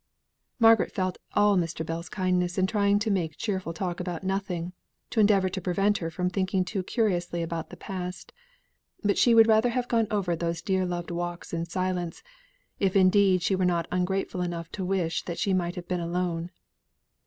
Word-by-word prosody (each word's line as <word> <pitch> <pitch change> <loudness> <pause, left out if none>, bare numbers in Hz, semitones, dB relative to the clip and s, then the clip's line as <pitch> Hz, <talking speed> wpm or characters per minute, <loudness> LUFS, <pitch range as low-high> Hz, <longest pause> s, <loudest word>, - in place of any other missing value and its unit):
Margaret 225 -2 +5
felt 185 -1 -2
all 205 0 +4
Mr. 165 -2 -2
Bell's 165 +1 -5
kindness 180 -2 0
in 190 - +3
trying 200 0 +2
to 210 +1 0
make 165 -5 -1
cheerful 190 -6 -2
talk 175 +1 -3
about 180 -1 -4
nothing, 185 -2 -2 0.4
to 225 - 0
endeavour 200 -3 +4
to 190 +1 -4
prevent 195 +4 +1
her 165 - -3
from 180 +2 -2
thinking 185 0 0
too 195 +1 -2
curiously 175 -5 -1
about 165 0 -4
the - - -11
past. 180 -1 -6 0.7
But 205 -1 +2
she 235 -2 +5
would 225 -1 +8
rather 220 +2 +4
have 245 +1 -1
gone 230 -2 +2
over 195 -6 0
these 170 0 -3
dear 190 -1 +1
loved 175 -1 -4
walks 175 0 -4
in 165 0 -1
silence, 180 0 -3 0.6
if 195 -1 +1
indeed 190 -1 +4
she 195 - +1
were 185 - 0
not 170 -2 +1
ungrateful 185 0 -1
enough 170 -2 -4
to 195 - -4
wish 180 -3 0
that 170 -1 -4
she 195 - +1
might 175 -1 0
have 175 -1 -7
been 180 -1 -1
alone. 170 0 -2
185 Hz, 190 wpm, -27 LUFS, 175-195 Hz, 0.7 s, would